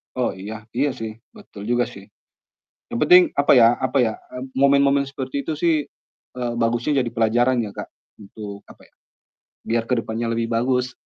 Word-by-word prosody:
Oh, 125 - -1
iya, 110 +3 -8
iya 140 +3 +1
sih, 110 -3 -6 0.2
betul 100 - -12
juga 120 0 +2
sih. - - -12 0.9
Yang 115 - -1
penting 180 +1 +10
apa 140 - +2
ya 115 0 +7
apa 130 +2 -1
ya, 110 - -1 0.2
eee, 125 +1 -7
momen-momen 140 0 +4
seperti 135 0 -4
itu 155 +1 -4
sih, 165 +1 +2 0.6
eee, 120 -1 -2
bagusnya 120 +4 +1
jadi 120 - -2
pelajaran 120 +3 +2
ya 100 - -7
Kak, - - -7 0.3
untuk, 100 0 -9
apa - - -16
ya, - - -27 0.7
biar 115 0 0
ke 125 - +2
depannya 115 +1 -3
lebih 115 0 -2
bagus, 125 +2 0
120 Hz, 175 wpm, -22 LUFS, 115-135 Hz, 0.9 s, penting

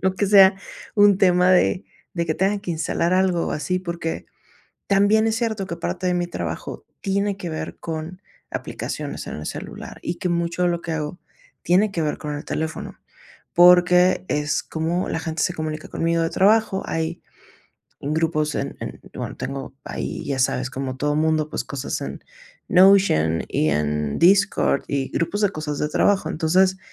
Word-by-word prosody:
No 190 0 +1
que 205 - +1
sea 195 -1 +7 0.4
un 205 -2 +6
tema 180 -2 +4
de 185 0 +3 0.3
de 170 -1 -2
que 155 - 0
tenga 195 +4 +1
que 195 - -5
instalar 170 +2 0
algo 185 -2 +2
o - - -2
así, 155 +5 -1
porque 170 -2 -4 0.6
también 205 +2 +4
es 220 - 0
cierto 220 -4 -2
que 170 - -5
parte 90 - -3
de 180 - +1
mi 175 0 0
trabajo 85 - -5 0.2
tiene 200 +1 0
que 180 - -5
ver 155 -1 -5
con 165 +2 -6 0.3
aplicaciones - - -5
en - - -5
el 75 - -7
celular, - - -7
y 175 - -3
que 180 - -2
mucho 170 0 -1
de - - +3
lo 170 -1 -2
que 165 - -4
hago 155 +2 -4 0.4
tiene 195 +4 +3
que 170 - -1
ver 150 -1 -1
con 150 -1 -5
el 145 - -6
teléfono. 155 0 -4 0.6
Porque 180 +1 +6
es 150 0 0
como 165 +3 -2
la 160 - -2
gente 160 -1 -3
se 175 - -1
comunica 155 -2 -5
conmigo 165 0 0
de 165 - 0
trabajo, 210 0 +3
hay 165 +1 -3 0.8
grupos 155 0 0
en - - -3
en, - - -6 0.2
bueno, - - -5
tengo 135 -1 -6
ahí, - - -5
ya 135 -2 -2
sabes, 130 0 +1
como 130 -1 -4
todo 145 +2 0
mundo, 155 0 +1
pues, 130 - -3
cosas 140 0 -4
en - - -6 0.5
Notion 180 - +5
y 75 - +1
en 75 -1 -1
Discord 195 -5 +3
y 135 -2 -2
grupos 200 +5 -1
de 205 - +3
cosas 155 -4 -4
de 150 - -1
trabajo. 195 +5 +2
Entonces, 185 +4 +2
170 Hz, 180 wpm, -22 LUFS, 150-190 Hz, 0.8 s, sea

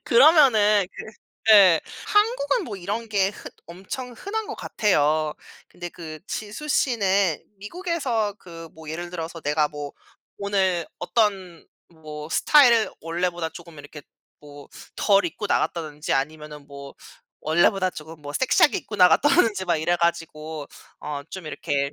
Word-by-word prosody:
그러면은 235 - +5
그 - - -9 0.4
네 195 -6 +7 0.3
한국은 470 +1 +2
뭐 210 - -6
이런 205 +5 -4
게 195 -2 +1
흔 - - -11 0.2
엄청 190 +9 -7
흔한 435 - -4
것 420 - -6
같아요. 155 -7 +1 0.4
근데 175 0 -8
그 160 -3 -9
지수 215 +8 -6
씨는 200 - +1 0.2
미국에서 245 - -2
그 165 -3 -11
뭐 160 -1 -10
예를 175 +2 -5
들어서 165 -1 -6
내가 150 0 +1
뭐 145 -1 -7 0.5
오늘 190 -4 0
어떤 185 -2 -1 0.2
뭐 155 -2 -10
스타일을 235 - +5
원래보다 170 0 -2
쪼금 170 -2 -12
이렇게 145 +1 -11 0.4
뭐 145 -1 -13 0.3
덜 200 -1 +3
입고 175 +5 -4
나갔다든지 155 -5 -2
아니면은 150 +1 -3
뭐 140 -1 -11 0.5
원래보다 180 +4 +2
조금 160 -1 -11
뭐 145 0 -7
섹시하게 260 - +3
입고 210 - -8
나갔다든지 205 - +4
막 170 -2 +2
이래 160 +3 0
가지고 160 -3 -3 0.3
어 145 -1 -5
좀 190 -4 -8
이렇게 140 -2 -2
175 Hz, 285 characters per minute, -24 LUFS, 155-210 Hz, 0.5 s, 네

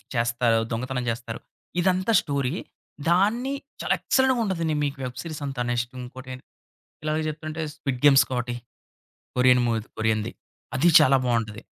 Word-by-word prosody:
చేస్తారు? 115 -1 +2
దొంగతనం 125 +2 -2
చేస్తారు? 115 0 -6 0.4
ఇదంతా 185 +3 +2
స్టోరీ. 140 -3 -1 0.6
దాన్ని 215 +10 +2 0.3
చాలా - - +1
ఎక్సలెంట్‌గా 260 -2 +2
ఉంటదండి 165 -5 -1
మీకు 140 0 -3
వెబ్ 125 -1 -6
సీరీసంతా. 145 -6 -4
నెక్స్ట్ 120 +1 -2
ఇంకోటి 130 +1 -9 0.7
ఇలా 155 - 0 0.2
చెప్తుంటే 155 +1 -5
స్విడ్ 135 -5 -3
గేమ్స్ 135 -2 +7
ఒకటి 120 0 -2 0.8
కొరియన్ 125 0 +5
మూవీ. 115 -1 +1 0.2
కొరియన్‌ది. 110 0 0 0.4
అది 155 +7 +4
చాలా 135 +1 +5
బావుంటది. 115 -2 -1
130 Hz, 130 wpm, -25 LUFS, 120-155 Hz, 0.8 s, గేమ్స్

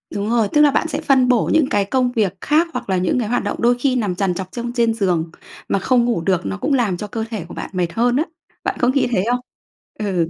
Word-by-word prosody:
Đúng 205 +1 -2
rồi, 230 -2 +2
tức 295 - +5
là 295 -1 +6
bạn 325 - +1
sẽ - - -3
phân 265 -2 +3
bổ 245 -3 +2
những 315 -4 +3
cái 205 -1 +1
công 250 +3 +1
việc 215 -6 0
khác 315 +3 +2
hoặc - - -5
là 190 - +2
những 180 +7 +1
cái 230 - -1
hoạt 245 -2 0
động 205 - -3
đôi 240 +1 +4
khi 260 -1 +1
nằm 205 -7 -1
trằn 190 -1 0
trọc 185 +1 -6
trong 240 0 -4
trên 235 -2 +2
giường, 175 -6 0 0.4
mà 195 - +1
không 245 +3 +2
ngủ 235 -8 0
được, 185 0 0
nó 95 -1 -3
cũng 285 - -1
làm 225 -9 +1
cho 210 - -5
cơ 220 +2 -4
thể 210 -7 -5
của 175 - -11
bạn - - -6
mệt 175 -2 -1
hơn 240 +2 +2
á. 305 - +2 0.4
Bạn - - -1
có 245 - +2
nghĩ 265 +2 +2
thế 185 -6 +1
không? 245 - +1 0.6
Ừ. 185 -6 0
225 Hz, 280 wpm, -20 LUFS, 190-250 Hz, 0.6 s, là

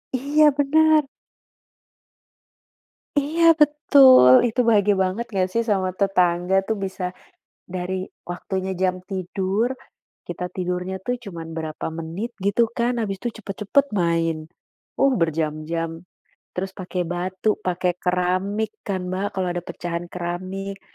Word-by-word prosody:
Iya, 290 +4 +3
bener. 305 +1 +4 2.1
Iya, 325 +3 +4
betul, 285 - +7 0.2
itu 235 - -4
bahagia 205 -2 +4
banget 190 +5 0
gak 185 -2 +1
sih 230 0 +2
sama 195 -4 0
tetangga 180 -2 +2
tuh 220 - 0
bisa 185 -1 -5 0.5
dari 185 +1 -4 0.2
waktunya 190 +1 -3
jam 185 -1 0
tidur, 195 +5 -1 0.5
kita 180 - -4
tidurnya 180 +1 -3
tuh 245 +4 -1
cuman 170 -5 -7
berapa 155 -1 -4
menit 165 +8 -5
gitu 205 +4 +1
kan, 235 0 -1
abis 195 -3 -2
itu 240 +5 -3
cepet-cepet 210 +8 +1
main. 165 -2 +1 0.6
Oh, 275 0 +3
berjam-jam 165 +1 -2 0.5
terus 190 +1 -3
pakai 180 -2 -4
batu, 185 +4 -1
pakai 180 0 0
keramik 185 +4 0
kan, 185 -2 -2
Mbak, 190 +2 -2
kalau 185 -1 0
ada 175 - -3
pecahan 175 0 -5
keramik 185 +3 -5
190 Hz, 120 wpm, -23 LUFS, 180-220 Hz, 2.1 s, betul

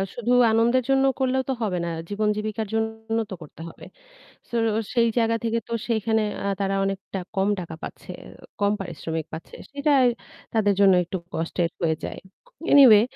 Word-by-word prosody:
শুধু 240 0 -1 0.2
আনন্দের 235 +3 +3
জন্য 270 0 +4
করলেও 260 0 +1
তো 265 - +2
হবে 190 -4 -1
না, 170 - -2 0.2
জীবন 210 +1 0
জীবিকার 215 0 -3
জন্য 220 0 -2
তো - - -6
করতে 155 +1 -12
হবে। - - -13 0.6
So - - -9 0.4
সেই 235 -2 +4
জায়গা 230 0 +2
থেকে 230 0 +1
তো - - -7 0.2
সেইখানে 220 -1 +1 0.2
আ - - -1
তারা 195 0 0
অনেকটা 195 0 -4 0.2
কম 195 +1 +2
টাকা 170 -2 -7
পাচ্ছে, - - -8 0.3
ও - - -15 0.2
কম 205 0 +3
পারিশ্রমিক 160 -3 -4
পাচ্ছে। 160 +1 -8 0.2
সেটা 285 +1 0 0.6
তাদের 205 -2 +3
জন্য 195 -2 +7
একটু 185 - -4 0.2
কষ্টের 165 +1 -1
হয়ে 160 -1 +2
যায়। - - -5 0.5
Anyway 250 -7 +9
215 Hz, 170 wpm, -24 LUFS, 190-230 Hz, 0.6 s, Anyway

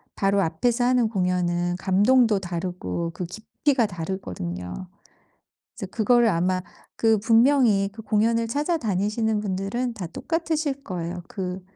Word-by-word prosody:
바로 195 0 +2
앞에서 230 +9 0
하는 245 -2 +3
공연은 180 -3 0
감동도 205 +4 +3
다르고 175 - -4
그 180 - -4
깊이가 230 - 0
다르거든요. 130 - -5 0.9
이제 210 - -6
그걸 235 +4 +3
아마 185 0 +1 0.3
그 225 -1 +3
분명히 225 -2 +4
그 220 - -10
공연을 225 +2 +1
찾아다니시는 220 - 0
분들은 205 +5 -2
다 205 -6 -6
똑같으실 310 - -2
거예요. 175 -1 -4
그 185 -1 -5
200 Hz, 290 characters per minute, -24 LUFS, 180-235 Hz, 0.9 s, 분명히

